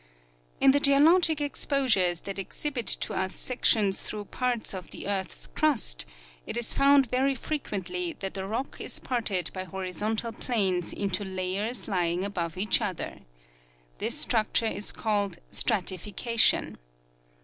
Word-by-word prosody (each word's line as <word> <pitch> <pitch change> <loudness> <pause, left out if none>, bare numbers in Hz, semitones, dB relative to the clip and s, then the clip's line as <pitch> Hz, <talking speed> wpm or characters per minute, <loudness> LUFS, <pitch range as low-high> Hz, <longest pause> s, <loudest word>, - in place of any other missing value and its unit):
In 270 - +6
the 285 - +3
geologic 310 +3 +4
exposures 255 - +2
that 195 0 -6
exhibit 245 +3 -3
to - - +3
us 190 0 -2
sections 215 -5 +2
through 210 -1 -6
parts 245 0 -2
of 185 -2 -7
the - - -6
earth's 195 -2 -2
crust 290 - +1 0.4
it - - -3
is 240 - +3
found 280 0 +5
very 265 +2 +1
frequently 185 - -3
that 195 -1 -6
the 190 -1 -4
rock 230 +6 -4
is - - -4
parted 210 -8 -1
by 185 - -4
horizontal 190 +5 -3
planes 195 -7 -1
into 200 0 -2
layers 190 +5 -2
lying 180 -2 0
above 175 -4 -3
each 210 +5 +3
other. 195 -5 -4 0.8
This - - -1
structure 225 0 +2
is 205 -2 -1
called 205 -5 -1
stratification. 210 +2 +2
210 Hz, 135 wpm, -27 LUFS, 185-250 Hz, 0.8 s, In